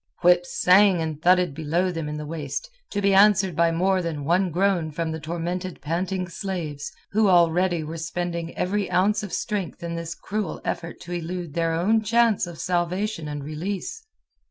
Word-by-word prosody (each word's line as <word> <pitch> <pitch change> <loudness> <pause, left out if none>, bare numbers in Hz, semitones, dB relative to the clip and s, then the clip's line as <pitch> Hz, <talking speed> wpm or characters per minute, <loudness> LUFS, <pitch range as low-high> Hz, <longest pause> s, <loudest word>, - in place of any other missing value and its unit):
Whips 175 0 +3
sang 190 0 +6
and 160 -2 -3
thudded 180 -2 +4
below 165 +5 0
them 165 -3 -4
in 150 - -4
the 150 - -5
waist, 155 - -5 0.2
to 205 -1 -2
be 200 0 +4
answered 195 -3 +5
by 170 +1 +4
more 185 +3 +2
than 155 -5 -4
one 180 +4 +2
groan 180 -1 +1
from 160 +1 -3
the 160 - -4
tormented 175 +3 -4
panting 180 +4 -2
slaves, 170 -6 -5 0.2
who 215 +1 +3
already 175 -1 +3
were 160 +2 -6
spending 170 0 -4
every 200 +2 0
ounce 185 +4 +2
of 205 -3 -6
strength 200 -5 -3
in 170 0 -3
this 170 0 -4
cruel 205 -4 -4
effort 170 0 -4
to 175 - -9
elude 175 -2 -4
their 165 0 0
own 205 +7 +2
chance 225 -3 +2
of 170 -2 -8
salvation 180 +1 -1
and 145 -1 -5
release. 185 - -4
175 Hz, 180 wpm, -24 LUFS, 165-190 Hz, 0.2 s, sang